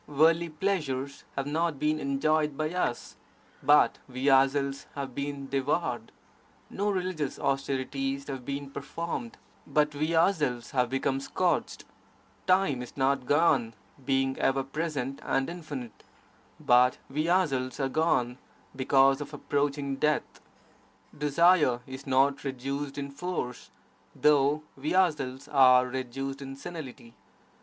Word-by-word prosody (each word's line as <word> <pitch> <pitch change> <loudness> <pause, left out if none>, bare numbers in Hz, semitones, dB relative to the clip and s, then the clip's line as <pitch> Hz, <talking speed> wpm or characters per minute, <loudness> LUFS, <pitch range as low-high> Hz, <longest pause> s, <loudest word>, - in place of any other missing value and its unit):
Worldly 165 +3 +3
pleasures 150 -6 -2
have 135 - -2
not 160 +1 -1
been 155 +2 0
enjoyed 150 +1 +1
by 155 +2 -2
us, 180 -9 -2 0.4
but - - +4
we 130 +3 0
ourselves 135 +1 +2
have 135 -2 -5
been 140 0 -4
devoured; 135 -3 -1 0.6
no 205 +1 -1
religious 185 -7 -2
austerities 135 0 -2
have 135 -3 -5
been 140 +1 -5
performed, 165 -6 -5 0.3
but 150 0 +2
we 155 +3 -1
ourselves 155 -9 +1
have 125 -2 +1
become 135 +1 0
scorched; 135 - -1 0.6
time 185 -9 +3
is 125 - -10
not 135 -1 +1
gone 145 -7 +3 0.3
(being 135 0 +1
ever 135 0 +2
present 135 -2 -3
and 135 +4 0
infinite), 145 -9 -8 0.6
but 125 +1 +4
we 155 +4 -1
ourselves 140 -9 +1
are 135 - +1
gone 130 -4 +1 0.4
(because 135 +1 +4
of 145 +1 -6
approaching 140 -1 -1
death). 150 +2 -1 0.7
Desire 150 -3 +4
is 130 +1 -9
not 135 +1 +2
reduced 140 +1 -4
in 140 -1 -4
force, 140 -5 -4 0.5
though 150 0 +3
we 145 +6 -2
ourselves 145 -7 +1
are 130 -3 +6
reduced 130 +2 -4
to 135 -1 -7
senility. 135 -6 -9
140 Hz, 125 wpm, -28 LUFS, 135-155 Hz, 0.7 s, are